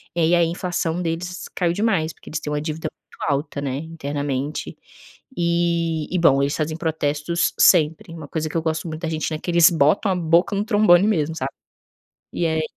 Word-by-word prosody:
E -, -, -1 dB
aí 165 Hz, +2 st, +4 dB
a 170 Hz, -, +4 dB
inflação 175 Hz, 0 st, -2 dB
deles 175 Hz, +2 st, -4 dB
caiu 170 Hz, -2 st, +1 dB
demais, 195 Hz, -6 st, 0 dB
porque -, -, -15 dB
eles 155 Hz, -, -3 dB
têm 150 Hz, -, -4 dB
uma 150 Hz, -, -1 dB
dívida 155 Hz, +1 st, -4 dB
muito 145 Hz, -, -6 dB
alta, 140 Hz, +1 st, -2 dB
né, 135 Hz, -1 st, -2 dB
internamente. 145 Hz, -2 st, -4 dB, 0.6 s
E 170 Hz, -2 st, 0 dB
e, 180 Hz, -, +1 dB
bom, 140 Hz, -5 st, +4 dB
eles 140 Hz, -, 0 dB
fazem 155 Hz, +1 st, -2 dB
protestos 160 Hz, 0 st, -1 dB
sempre, 165 Hz, +2 st, +4 dB
uma 155 Hz, -3 st, -9 dB
coisa 160 Hz, +1 st, -3 dB
que -, -, -10 dB
eu -, -, 0 dB
gosto 160 Hz, +1 st, -2 dB
muito 155 Hz, 0 st, -6 dB
da 165 Hz, -, -2 dB
Argentina 155 Hz, 0 st, -2 dB
é -, -, -15 dB
que -, -, -5 dB
eles 170 Hz, 0 st, +7 dB
botam 165 Hz, +6 st, +2 dB
a -, -, +1 dB
boca 170 Hz, +4 st, +2 dB
no 200 Hz, -, 0 dB
trombone 205 Hz, -3 st, +5 dB
mesmo, 160 Hz, -6 st, 0 dB
sabe. 135 Hz, -2 st, -3 dB, 0.8 s
E 170 Hz, -, 0 dB
aí 160 Hz, -1 st, 0 dB
165 Hz, 200 wpm, -22 LUFS, 155-175 Hz, 0.8 s, eles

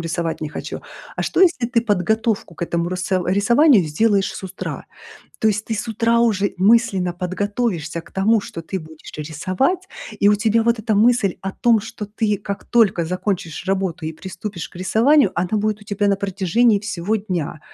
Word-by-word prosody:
рисовать 165 Hz, 0 st, -3 dB
не 155 Hz, -, -3 dB
хочу. -, -, -6 dB, 0.4 s
А -, -, -1 dB
что -, -, 0 dB
если 340 Hz, -10 st, +4 dB
ты 240 Hz, -1 st, +1 dB
подготовку 220 Hz, -2 st, 0 dB
к 170 Hz, -, -7 dB
этому 170 Hz, 0 st, -1 dB
рысов 185 Hz, 0 st, -1 dB
рисованию 235 Hz, -, +5 dB
сделаешь 200 Hz, +5 st, +1 dB
с -, -, -8 dB
утра? 190 Hz, 0 st, -6 dB, 0.5 s
То 220 Hz, -, +3 dB
есть 210 Hz, 0 st, -1 dB
ты 225 Hz, -, -3 dB
с 215 Hz, -, -4 dB
утра 230 Hz, +1 st, +2 dB
уже 205 Hz, -4 st, +1 dB
мысленно 195 Hz, -3 st, +3 dB
подготовишься 185 Hz, -1 st, -2 dB
к -, -, -18 dB
тому, 215 Hz, +3 st, +3 dB
что 165 Hz, -, -8 dB
ты 190 Hz, +4 st, -4 dB
будешь 160 Hz, -2 st, -12 dB
рисовать, 185 Hz, -, -1 dB, 0.3 s
и 200 Hz, -, +5 dB
у 210 Hz, -, +5 dB
тебя 225 Hz, +2 st, +2 dB
вот 235 Hz, 0 st, +2 dB
эта 220 Hz, 0 st, -1 dB
мысль 220 Hz, -2 st, +3 dB
о 195 Hz, 0 st, -4 dB
том, 230 Hz, 0 st, +3 dB
что 215 Hz, 0 st, -7 dB
ты 210 Hz, 0 st, -1 dB
как 200 Hz, 0 st, -6 dB
только 215 Hz, -8 st, +3 dB
закончишь 180 Hz, -1 st, -3 dB
работу 190 Hz, -3 st, -1 dB
и 160 Hz, -, -3 dB
приступишь 185 Hz, +2 st, -7 dB
к -, -, -16 dB
рисованию, 225 Hz, -, +3 dB
она 175 Hz, +1 st, -1 dB
будет 215 Hz, 0 st, 0 dB
у 210 Hz, -, -14 dB
тебя 205 Hz, 0 st, 0 dB
на 200 Hz, -, +2 dB
протяжении 200 Hz, +3 st, +2 dB
всего 210 Hz, 0 st, -2 dB
дня. 175 Hz, -7 st, -4 dB
200 Hz, 185 wpm, -20 LUFS, 180-225 Hz, 0.5 s, рисованию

